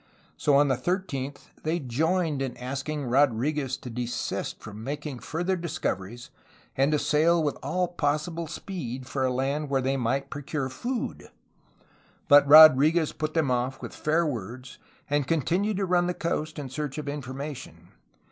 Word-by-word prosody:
So 145 - +2
on 145 +1 +5
the 130 -2 +1
13th 145 -3 -3
they 160 +2 0
joined 155 +2 0
in 130 -3 -3
asking 135 +3 -4
Rodriguez 135 +2 +1
to 125 - -9
desist 120 +1 -3
from 110 +1 -9
making 145 0 -5
further 170 - -2
discoveries 120 - -4 0.4
and 135 +3 +2
to 150 - +3
sail 155 +3 +3
with 145 -2 0
all 180 +7 0
possible 165 +1 -2
speed 135 -8 -6
for 135 0 -2
a 130 - +1
land 135 +4 -1
where 135 -1 +2
they 135 +1 0
might 135 +2 -1
procure 145 -1 -3
food. 235 - -4 1.0
But 145 -1 +7
Rodrfguez 155 +2 +8
put 155 +1 -3
them 155 -5 +2
off 125 +2 -1
with - - -8
fair 160 +3 +1
words, 125 -1 -6 0.3
and 145 -2 0
continued 175 - 0
to 195 - 0
run 175 -1 +2
the 180 - -2
coast 155 -2 -3
in 140 -3 -5
search 145 +1 -4
of 150 -2 -5
information. 140 -1 -6
145 Hz, 155 wpm, -27 LUFS, 130-160 Hz, 1.0 s, Rodrfguez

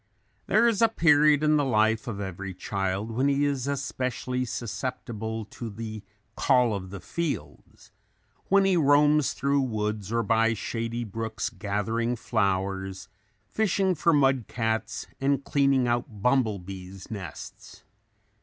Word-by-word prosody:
There 235 - +4
is 230 -3 +1
a 230 - +7
period 150 -6 +4
in 150 0 +4
the 145 - +2
life 110 -1 +2
of 105 -4 -4
every 95 -1 -5
child 95 +3 -2
when 130 +5 +1
he 140 +1 +2
is 140 -2 -1
especially 130 -2 -2
susceptible 115 -2 -4
to 115 - -6
the 110 0 -6 0.3
"call 125 -3 +3
of 95 -2 -5
the 100 +1 -7
fields;" 150 - -5 0.6
when 195 0 +4
he 190 -1 +3
roams 150 -1 +4
through 140 0 +1
woods 105 -4 -2
or 115 0 +1
by 115 +1 +2
shady 115 +2 -3
brooks 110 +1 -4
gathering 110 +4 -1
flowers, 95 -4 -1 0.4
fishing 195 - +1
for 170 +1 +2
mud 135 -5 +3
cats 110 -1 -2
and 140 0 +1
cleaning 135 -3 +2
out 120 -3 -2
bumble 125 -5 +2
bees' 95 +1 -10
nests. 95 -8 -9
115 Hz, 135 wpm, -27 LUFS, 105-140 Hz, 0.6 s, a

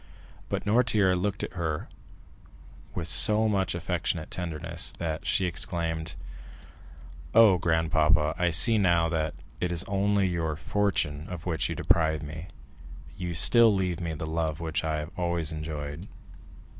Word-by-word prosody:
But - - -3
Noirtier 105 -4 +3
looked 100 +2 -2
at - - -5
her 80 -4 -3 1.1
with 85 -2 -3
so 105 +7 +3
much 95 -4 0
affectionate 85 -2 -2
tenderness 85 -4 -3
that 80 -1 -4
she 95 - +2
exclaimed: 80 -2 -2 1.2
"Oh, 110 -5 +7
grandpapa, 80 -2 +2
I 90 -1 +1
see 95 +8 +4
now 85 -4 +3
that 80 -2 -1 0.2
it 90 - -1
is 85 0 +1
only 100 0 +1
your 85 -3 -1
fortune 80 -5 -1
of 90 -2 -7
which 80 -4 -1
you - - -3
deprive 80 -2 +2
me; 80 +4 -7 0.7
you 90 -2 -4
still 115 +6 +6
leave 90 -3 -1
me 85 -2 -3
the 80 - -5
love 80 -1 -2
which 80 -4 -2
I 80 -1 -1
have 75 +3 -8
always 85 -3 -1
enjoyed." 75 +2 -5
85 Hz, 145 wpm, -27 LUFS, 80-95 Hz, 1.2 s, Oh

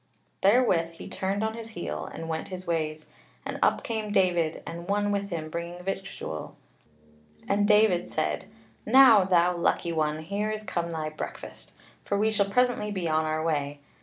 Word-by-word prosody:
Therewith 190 -6 +3
he - - -10
turned 195 +2 -2
on 220 0 -1
his 225 0 -7
heel, 175 - -4
and 165 - -7
went 160 -1 -3
his 185 -1 -7
ways, 155 -2 -2 0.4
and - - -4
up - - +3
came 220 -2 -3
David 175 -5 +1
and 170 +1 -7
one 205 +1 +1
with 200 0 -1
him 165 -4 -4
bringing 170 +2 -6
victual; 195 - -5 0.9
and 205 +1 +2
David 210 -4 +4
said: - - -1 0.4
"Now, 255 -6 +7
thou 180 -1 +3
lucky 170 0 0
one, 155 -1 -1
here 200 +5 -2
is 215 0 -3
come 170 -4 -2
thy 160 -2 -3
breakfast! 155 - -8 0.3
for 200 - -1
we 215 +2 +2
shall 200 -2 +1
presently 245 -1 +2
be 185 -4 -2
on 155 0 +1
our 155 0 -1
way. 145 -3 -1
180 Hz, 170 wpm, -27 LUFS, 165-205 Hz, 0.9 s, Now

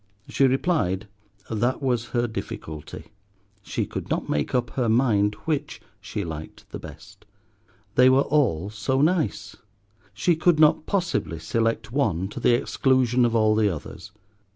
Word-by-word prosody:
She 135 - +3
replied, 125 - 0 0.4
that 120 +4 0
was 125 -4 0
her 120 +1 0
difficulty. 80 -10 -7 0.5
She - - -3
could - - -6
not - - -1
make 75 - -1
up 120 -1 0
her 125 -4 0
mind 110 -4 +2
which 150 -2 -2 0.2
she 100 +1 -5
liked 80 -2 -8
the - - -6
best. - - -13 0.7
They 125 +1 +6
were 135 +1 +4
all 105 - +1
so 115 +5 -1
nice. 160 0 0 0.5
She 105 - +1
could 160 0 +2
not 155 0 +4
possibly 175 - -1
select 115 +6 -1
one 95 - 0
to - - -7
the 120 - +4
exclusion 130 -3 +2
of 115 -1 0
all 110 -1 +4
the 110 -1 +3
others. 85 +1 -7
120 Hz, 150 wpm, -24 LUFS, 100-135 Hz, 0.7 s, They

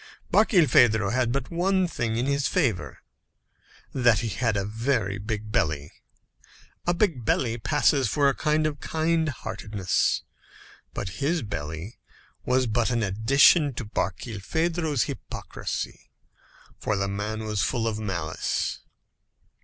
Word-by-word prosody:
Barkilphedro 120 - +5
had 125 0 +1
but 135 0 -3
one 185 +2 +2
thing 115 -8 -2
in 120 - 0
his 140 0 +1
favour 100 - -1 0.9
that 120 -4 +3
he 115 - -2
had 110 +2 0
a 100 - -1
very 110 -2 -1
big 105 0 -4
belly. 75 -6 0 1.0
A 175 - +4
big 170 - +1
belly 115 +1 0
passes 135 0 +2
for 140 +4 +3
a 135 - +2
sign 155 0 +1
of 150 -2 -2
kind 160 0 0
heartedness. 105 - -1 0.7
But 95 +8 -5
his 160 +3 +1
belly 80 0 -6 0.5
was 130 0 +3
but 115 +1 +1
an 120 -2 0
addition 135 - +4
to 120 - -4
Barkilphedro's 135 - -1
hypocrisy; - - -6 0.7
for 110 - -1
the 100 0 0
man 105 +2 -3
was 105 -2 -1
full 115 -3 0
of 110 -1 -2
malice. 95 -5 -2
120 Hz, 130 wpm, -26 LUFS, 105-145 Hz, 1.0 s, Barkilphedro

